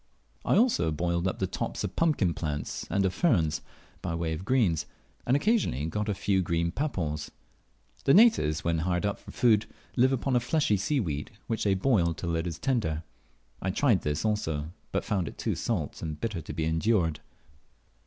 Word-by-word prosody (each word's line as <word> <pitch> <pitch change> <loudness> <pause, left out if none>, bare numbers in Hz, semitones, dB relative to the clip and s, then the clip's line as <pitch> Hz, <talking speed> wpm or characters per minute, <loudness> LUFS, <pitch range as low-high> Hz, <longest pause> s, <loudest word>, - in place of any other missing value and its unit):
I - - +3
also 220 - +3
boiled 85 +3 0
up 95 - -2
the 95 - 0
tops - - -3
of - - -4
pumpkin 145 - +2
plants 75 -3 -4
and 95 +2 +1
of 95 - 0
ferns, 85 - +2 0.4
by 85 -2 -2
way 85 -1 -1
of 80 +3 -5
greens, 95 - +2 0.4
and 130 +3 +4
occasionally 165 - +1
got 105 +6 -2
a 105 - 0
few 95 0 +1
green 85 -1 0
papaws. 85 - -2 0.8
The 135 - +5
natives, 190 - +5
when 85 -1 +1
hard 90 +3 0
up 100 - -1
for - - -14
food, 110 -3 +3 0.3
live 130 +1 +4
upon 135 0 0
a - - +5
fleshy 125 -2 +1
seaweed, 95 - -1 0.2
which 115 -2 -2
they 100 -1 +3
boil 95 -6 +2
till 85 -1 -2
it 80 +1 -1
is 85 -2 -4
tender. 85 - -1 0.6
I 95 - -1
tried 115 -1 +3
this 75 +6 -1
also, 80 -8 -1 0.2
but - - -1
found 95 -4 0
it - - -8
too - - -1
salt - - -2
and 80 -2 -4
bitter 110 -7 -3
to - - -8
be 80 - -2
endured. 80 0 +1
90 Hz, 185 wpm, -28 LUFS, 80-115 Hz, 0.8 s, The